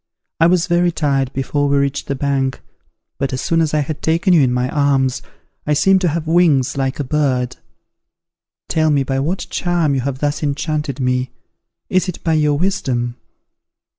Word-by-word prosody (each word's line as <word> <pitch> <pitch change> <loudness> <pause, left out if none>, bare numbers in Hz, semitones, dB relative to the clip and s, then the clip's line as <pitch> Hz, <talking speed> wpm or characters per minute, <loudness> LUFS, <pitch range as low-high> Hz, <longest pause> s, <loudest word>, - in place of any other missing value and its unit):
I 165 - +5
was 175 -1 +2
very 175 0 +2
tired 140 -5 0
before 145 +2 -1
we 140 - +2
reached 140 0 -1
the 140 - -1
bank: 135 -1 -1 0.6
but, 135 -1 -1
as 130 - -2
soon 165 0 +1
as 155 -2 0
I 150 - +2
had 150 +1 -5
taken 170 +4 +2
you 165 - +6
in 130 -2 +2
my 125 0 0
arms, 135 -3 +1 0.5
I 150 - +2
seemed 190 +5 +4
to 180 - +2
have 165 0 -1
wings 155 -5 +3
like 135 0 -2
a - - 0
bird. 130 -3 0 1.1
Tell 155 -1 +1
me 145 -2 +2
by 135 0 -2
what 165 +8 -2
charm 175 -4 0
you 135 - 0
have 135 +1 -3
thus 145 +1 -2
enchanted 150 -1 -2
me! 125 0 0 0.6
Is 185 0 +1
it 180 - -7
by 165 - +1
your 150 -2 +2
wisdom? 130 -10 -1
145 Hz, 185 wpm, -18 LUFS, 135-165 Hz, 1.1 s, you